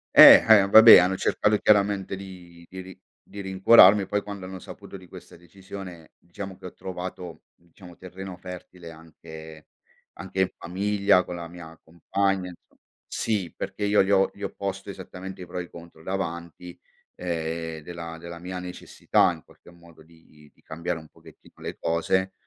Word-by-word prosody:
Eh, - - +10
eh, 105 -3 +6
vabbè 110 +3 +10
hanno 90 +2 +2
cercato 105 +2 +1
chiaramente 100 -2 +1
di 90 -3 -13
di 95 0 -8
rin 95 0 -13 0.2
di 100 - -12
rincuorarmi 95 +1 +5
poi 105 0 -1
quando 100 -2 -8
hanno 95 0 -8
saputo 100 - -11
di 90 -1 -16
questa - - -14
decisione 90 -2 -12
diciamo 95 +2 -9
che - - -15
ho 90 - -8
trovato, 90 -2 -8
diciamo, 85 +1 -17
terreno 95 +1 -10
fertile 90 -1 -11
anche 80 -1 -13 0.5
anche 95 0 -7
in 95 - +1
famiglia 100 0 +1
con 90 - -8
la 85 -1 -7
mia 80 -1 -13
compagna, 95 +3 -2
inso 85 - -18 0.3
sì 100 -6 -3
perché 105 - -5
io 100 -1 +3
gli 95 - -2
ho 95 -1 +3
gli 100 - -17
ho - - -2
posto 100 0 -6
esattamente 95 -1 -9
i - - -9
pro 90 - -7
e - - -4
i - - -14
contro 85 -1 -14
davanti, 85 -2 -6 0.4
ehm, 80 -2 -4
della 85 0 -8
della 85 +1 -10
mia 90 +1 -7
necessità 90 0 0
in - - -11
qualche - - -20
modo 85 -2 -19
di 80 -2 -22
di - - -30
cambiare 85 +1 -5
un 80 - -15
pochettino - - -19
le - - -7
cose 95 +3 -1
90 Hz, 170 wpm, -25 LUFS, 85-95 Hz, 0.5 s, Eh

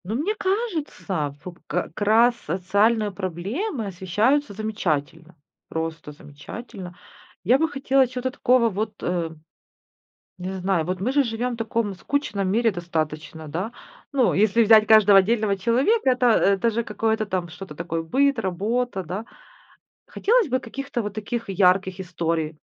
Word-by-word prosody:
Но 210 +5 -3
мне 310 - 0
кажется, 315 - -2
вот 180 -2 -8
как 180 +1 -3
раз 230 +4 +5
социальные 205 +5 +1
проблемы 205 - -3
освещаются 205 +8 0
замечательно, 170 -6 -3 0.3
просто 160 -2 -4
замечательно. 180 +6 -10 0.5
Я 240 +8 +4
бы 320 0 +2
хотела 270 -2 +2
чего-то 255 +1 -3
такого 250 -3 +3
вот, 215 +1 -3
э, 175 -2 -1 1.1
не 185 +1 -5
знаю, 185 -3 0
вот 185 +1 -3
мы 240 +6 0
же 285 +1 +3
живем 240 +1 -2
в - - -6
таком 225 -2 -1
скучном 205 -4 -2
мире 225 +3 +2
достаточно, 160 -2 -4
да. 185 +9 -3 0.4
Ну, 260 -4 +3
если 215 +3 +3
взять 215 -1 +6
каждого 210 -2 +7
отдельного 210 0 +1
человека, 260 - +2
это, 250 0 +1
э, 200 -3 +4
даже 230 +2 0
какое-то 220 +1 -1
там, 185 -4 -3
что-то 180 -1 -10
такое, 165 +1 -3
быт, 275 +9 +2
работа, 205 +2 -1
да. 185 +7 -5 0.8
Хотелось 460 -3 +2
бы 260 0 +1
каких-то 260 +1 -4
вот 205 -2 -5
таких 225 +2 -4
ярких 190 0 +2
историй. 165 -3 -2
210 Hz, 145 wpm, -24 LUFS, 180-240 Hz, 1.1 s, каждого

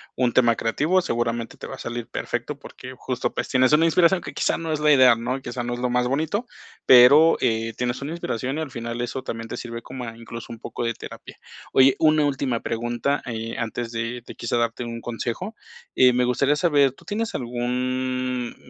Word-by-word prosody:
un 125 -2 +1
tema 120 -2 +4
creativo, 155 +11 +1
seguramente 115 -5 -2
te - - -8
va - - -7
a - - -15
salir 120 -1 -5
perfecto, 120 +4 -4
porque 130 -2 -11
justo, 125 -1 -3
pues, - - -3
tienes 130 +2 +3
una 160 +2 +5
inspiración 175 +3 +4
que - - -8
quizá - - 0
no 165 -1 -4
es 150 - -2
la 150 0 +4
idea, 130 -4 +7
¿no?, 125 +3 -3
quizá 120 0 -5
no 120 0 -3
es 120 - -5
lo 125 - 0
más 125 0 +1
bonito, 160 - -1 0.4
pero, 140 +6 +8
eh, 115 0 0
tienes 125 +1 -2
una 145 +3 -4
inspiración 135 -4 -3
y 160 - -2
al 150 - -5
final 115 -1 -5
eso 120 +2 -3
también 115 -2 -5
te - - -4
sirve 115 -1 -6
como 130 -1 -7
a 115 0 -8
incluso 115 0 -9
un 115 - -8
poco 120 - -5
de 115 0 0
terapia. - - -10 0.4
Oye, 135 0 +6
una 155 -1 +4
última 135 -4 -1
pregunta, 120 +4 -1
eh, 115 -1 -5
antes 115 +1 -3
de 115 +1 -4
de - - -10
quizá 120 0 -2
darte 115 +1 -1
un 115 -1 -5
consejo. 120 - -4 0.4
Eh, 125 -1 +6
me 125 0 +2
gustaría 135 +4 +2
saber, 145 -4 +3
¿tú - - -20
tienes 220 +2 -3
algún 125 0 -2
125 Hz, 210 wpm, -23 LUFS, 120-140 Hz, 0.4 s, pero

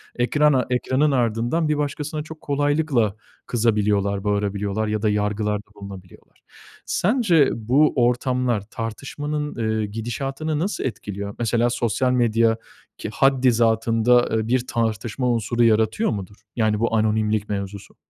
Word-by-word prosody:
ekrana 135 +2 +2
ekranının 130 +4 +1
ardından 120 +6 0
bir 150 - +1
başkasına 150 +1 -3
çok 160 0 -11
kolaylıkla 145 -6 +1 0.3
kızabiliyorlar, 105 -4 +1
bağırabiliyorlar 105 +1 -1
ya 105 0 -1
da 110 - +2
yargılarda 105 0 -1
bulunabiliyorlar. 100 -3 -12 0.5
Sence 185 - +3
bu 130 +7 +2
ortamlar 125 -2 +1
tartışmanın, 145 +6 -4
eee, 110 -2 -1
gidişatını 135 +8 -3
nasıl 195 +5 -2
etkiliyor? 100 -4 -5
Mesela 120 +1 +1
sosyal 120 +1 0
medya 115 -2 +2 0.4
ki - - -5
haddizatında, 120 -2 +3
eee, 110 0 -2
bir 125 0 0
tartışma 115 +2 -1
unsuru 120 +1 0
yaratıyor 110 - +2
mudur? 100 -2 -5 0.2
Yani, 110 -2 +1
bu 115 0 0
anonimlik 110 -1 +1
mevzusu. 100 -1 -5
115 Hz, 120 wpm, -22 LUFS, 105-135 Hz, 0.5 s, Sence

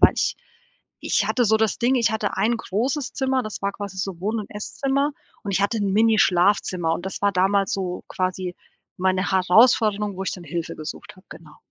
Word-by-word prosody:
Weil - - +7
ich - - 0 0.7
ich - - +1
hatte 245 - +1
so 220 +1 +4
das 220 -3 0
Ding, 250 +2 +2
ich 235 -4 +2
hatte 215 -2 -2
ein 225 +5 +2
großes 255 +8 -2
Zimmer, 265 -1 0
das 215 -1 -7
war 200 - 0
quasi 200 -1 -7
so 190 -2 -4
Wohn 215 +4 -1
und 205 - -9
Esszimmer 275 +7 -1 0.3
und 205 - -4
ich 195 - +1
hatte 220 +3 0
'n 200 -2 0
Mini 220 0 +4
Schlafzimmer, 180 -2 +2
und 175 +3 -6
das 190 - -6
war 200 0 +3
damals 195 +1 +2
so 185 -2 -3
quasi 185 -1 -2 0.4
meine 185 +1 +1
Herausforderung 210 +2 +4
wo 190 - -4
ich - - -2
dann 180 - -8
Hilfe 165 +1 -4
gesucht 155 +4 -8
habe, 185 - -19
genau. 155 -2 -13
200 Hz, 205 wpm, -23 LUFS, 185-220 Hz, 0.7 s, Weil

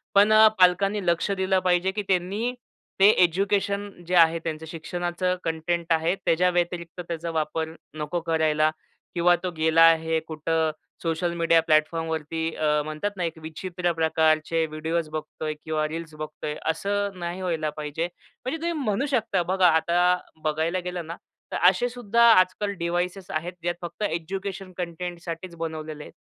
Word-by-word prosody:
पण 205 +2 +6 0.3
पालकांनी 190 +2 +3
लक्ष 170 +3 +1
दिलं 190 -1 +1
पाहिजे, 180 +1 +2
की 210 - -3
त्यांनी 195 +6 0 0.5
ते 195 - +8
एज्युकेशन 200 +3 +1 0.2
जे 180 - 0
आहे 165 -1 +5
त्यांचं 160 -1 -4
शिक्षणाचं 175 +2 -2
कंटेंट 165 +1 -1
आहे 165 +3 +1
त्याच्या 180 -1 +2
व्यतिरिक्त 175 0 -2
त्याचा 170 0 -4
वापर 160 0 -2 0.2
नको 150 +3 -2
करायला 155 -2 +2 0.5
किंवा 175 +1 +5
तो 185 - -1
गेला 160 +1 +3
आहे 160 0 +5
कुठं 160 0 0 0.3
सोशल 170 +1 -1
मीडिया 165 -1 +3
प्लॅटफॉर्मवरती 160 0 0 0.4
म्हणतात 155 +7 -3
ना 180 - -1
एक 165 -1 -3
विचित्र 175 +3 -3
प्रकारचे 160 0 +2
व्हिडिओस 160 +1 -2
बघतोय 155 0 -4
किंवा 155 -1 -1
रील्स 160 0 -6
बघतोय 155 0 -5 0.2
असं 200 +3 -2
नाही 175 +2 -4
व्हायला 165 -4 -1
पाहिजे. 150 +3 -3 0.4
म्हणजे 285 +5 -2
तुम्ही 340 +1 -1
म्हणू 210 +3 0
शकता 225 -8 +1
बघा 185 +1 +3
आता 175 +2 +3 0.3
बघायला 160 +4 0
गेलं 180 -1 -5
ना 165 - -5 0.4
तर - - -1
असे 220 +6 0
सुद्धा 235 -1 +1
आजकाल 185 +1 +3
डिव्हाइसेस 175 +2 -2
आहेत 165 +3 -3
जे 175 - 0
फक्त 175 +4 -6
एज्युकेशन 190 +2 -4
कंटेंटसाठीच 175 0 -5
बनवलेले 155 -2 -5
आहेत. - - -12
170 Hz, 145 wpm, -25 LUFS, 160-185 Hz, 0.5 s, ते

